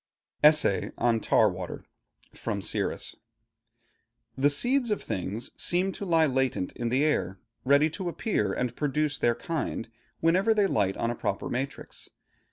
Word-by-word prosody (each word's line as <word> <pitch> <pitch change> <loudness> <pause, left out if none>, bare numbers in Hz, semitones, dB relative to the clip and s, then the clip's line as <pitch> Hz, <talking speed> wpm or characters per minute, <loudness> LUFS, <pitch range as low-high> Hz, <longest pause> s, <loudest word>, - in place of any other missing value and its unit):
ESSAY 150 -9 +5
ON 120 -2 +2
TAR 110 - +4
WATER 90 -2 -5 0.5
From - - -4
'Siris' - - -2 1.2
The 140 +2 +3
seeds 245 - +2
of 210 - -1
things 100 +5 -4
seem 185 +2 +1
to 200 - -6
lie 165 -3 +4
latent 130 -8 0
in 120 -1 -3
the 130 +4 +2
air, 95 -11 0 0.3
ready 140 +3 +5
to 175 +3 -4
appear 165 - -1
and 125 +3 -2
produce 150 0 -1
their 120 -1 +2
kind, 155 -7 -4 0.3
whenever 190 +7 +3
they 205 -2 +3
light 100 - 0
on 115 - 0
a - - -4
proper 100 - -3
matrix. 135 +3 -5
140 Hz, 150 wpm, -27 LUFS, 115-165 Hz, 1.2 s, ESSAY